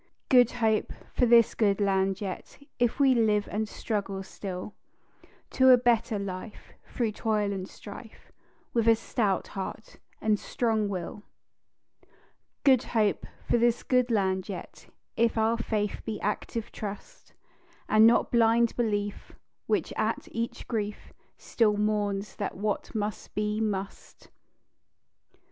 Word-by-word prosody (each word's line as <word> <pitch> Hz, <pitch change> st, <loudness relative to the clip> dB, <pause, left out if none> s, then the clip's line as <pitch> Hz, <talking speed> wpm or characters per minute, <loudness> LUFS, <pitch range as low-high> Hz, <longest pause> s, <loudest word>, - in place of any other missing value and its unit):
"Good 245 Hz, -3 st, +6 dB
Hope" 220 Hz, -3 st, +1 dB, 0.2 s
for 245 Hz, -, +3 dB
this 235 Hz, -1 st, +6 dB
good 205 Hz, -3 st, +2 dB
land 195 Hz, -1 st, +1 dB
yet, 190 Hz, -3 st, -6 dB, 0.2 s
If 240 Hz, +2 st, +1 dB
we 270 Hz, -2 st, +5 dB
live 215 Hz, -3 st, +2 dB
and 215 Hz, +1 st, -2 dB
struggle 195 Hz, -4 st, -3 dB
still 190 Hz, +1 st, -7 dB, 0.8 s
To 260 Hz, 0 st, +5 dB
a 255 Hz, -, +9 dB
better 235 Hz, -3 st, +1 dB
life, 200 Hz, +2 st, -7 dB
through 230 Hz, -3 st, -1 dB
toil 210 Hz, -1 st, 0 dB
and 190 Hz, -1 st, -5 dB
strife, 215 Hz, +2 st, -12 dB, 0.4 s
With 230 Hz, -1 st, +1 dB
a 225 Hz, -, +7 dB
stout 220 Hz, -3 st, -1 dB
heart 195 Hz, +2 st, -7 dB, 0.2 s
and 215 Hz, -1 st, +1 dB
strong 220 Hz, -4 st, 0 dB
will. 190 Hz, +1 st, -5 dB, 1.4 s
"Good 265 Hz, -4 st, +5 dB, 0.2 s
Hope" 210 Hz, -2 st, +1 dB, 0.2 s
for 240 Hz, -, +3 dB
this 235 Hz, 0 st, +2 dB
good 250 Hz, -1 st, +2 dB
land 190 Hz, -3 st, 0 dB
yet, 185 Hz, -3 st, -8 dB, 0.3 s
If 230 Hz, 0 st, +2 dB
our 225 Hz, +1 st, +2 dB
faith 210 Hz, -3 st, -2 dB
be 215 Hz, -2 st, -4 dB
active 215 Hz, +2 st, -3 dB
trust, 210 Hz, -, -8 dB, 0.5 s
And 215 Hz, +1 st, +6 dB
not 235 Hz, -, +3 dB
blind 230 Hz, 0 st, +3 dB
belief, 205 Hz, -3 st, -2 dB, 0.3 s
which, -, -, 0 dB
at -, -, -1 dB
each 235 Hz, +1 st, -4 dB
grief, 210 Hz, -3 st, -4 dB, 0.2 s
Still 210 Hz, -3 st, +1 dB
mourns 205 Hz, -1 st, -1 dB
that 200 Hz, -, -4 dB
what 210 Hz, +3 st, -3 dB
must 210 Hz, -1 st, -4 dB
be, 210 Hz, +1 st, -1 dB
must. 200 Hz, -2 st, -5 dB
215 Hz, 130 wpm, -28 LUFS, 200-230 Hz, 1.4 s, a